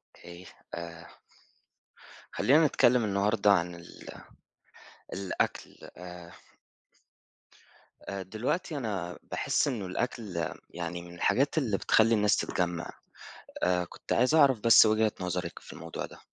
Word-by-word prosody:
إيه 85 +1 -12 0.3
آآ 85 0 -8 1.2
خلينا 155 +5 +4
نتكلم 125 -3 +3
النهاردة 105 +1 +2
عن 90 -2 +1
ال 85 0 -13 1.0
الأكل 95 -1 -3 0.2
آآ 90 -1 -10 1.7
آآ، 100 -1 -6
دلوقتي 125 - -3
أنا 95 -8 -4
باحس - - +1
إنه 120 -8 -2
الأكل، 95 -4 -3 0.2
يعني 85 0 -5
من 85 0 -12
الحاجات 140 - +1
اللي 110 -10 +1
بتخلّي 115 +1 +4
الناس 105 -1 +3
تتجمع. 85 -2 -2 0.7
آآ، 90 0 +2
كنت - - -5
عايز 125 +6 +3
أعرف 140 -7 +5
بس 115 +1 +7
وجهة 110 0 +3
نظرِك 90 -1 -3
في - - -12
الموضوع 85 0 -6
ده. - - -14
100 Hz, 120 wpm, -29 LUFS, 85-115 Hz, 1.7 s, بس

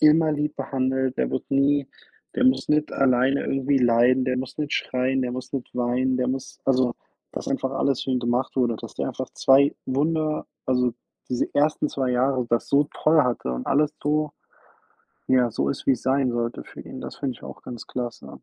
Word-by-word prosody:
immer 155 +1 +5
lieb 150 0 -2
behandelt, 130 -1 -1
der - - 0
wirde 130 - -2
nie 140 0 +2 0.5
der 250 - 0
muss 260 0 +3
nicht 150 0 +2
alleine 130 +1 +2
irgendwie 135 0 +1
leiden, 125 +1 +4
der 130 -1 0
muss 130 +2 -5
nicht 150 -1 -2
schreien, 130 +1 0
der 125 - -2
muss 130 +1 -6
nicht 135 -3 -4
weinen, 125 +1 +1
der 125 0 0
muss 130 +1 -4
also, 130 -2 +2 0.4
dass - - -6
einfach 130 - -1
alles 135 -1 0
für 135 - -3
ihn 130 - +2
gemacht 120 +2 -1
wurde, 120 -3 +2
dass - - -9
der - - -2
einfach - - -5
2 140 +2 +5
wunder 155 +3 0 0.2
also 125 -2 +2 0.4
diese 125 - 0
ersten 150 +1 +2
2 130 -3 -1
Jahre 125 +1 +1
das 120 - +1
so 145 +1 +3
toll 155 0 +4
hatte 120 - -1
und 60 0 -4
alles 150 +1 +2
so 150 0 0 1.0
ja, 125 -2 +4
so 115 - -1
ist, 140 - -6
wie 135 - +7
es 125 - -3
sein 135 -1 +2
sollte 120 0 -2
für - - -11
ihn. - - -9
Das - - -7
finde 135 -3 -2
ich - - -17
auch - - -9
ganz 120 -3 -8
klasse. 120 -2 -5
130 Hz, 200 wpm, -24 LUFS, 125-145 Hz, 1.0 s, wie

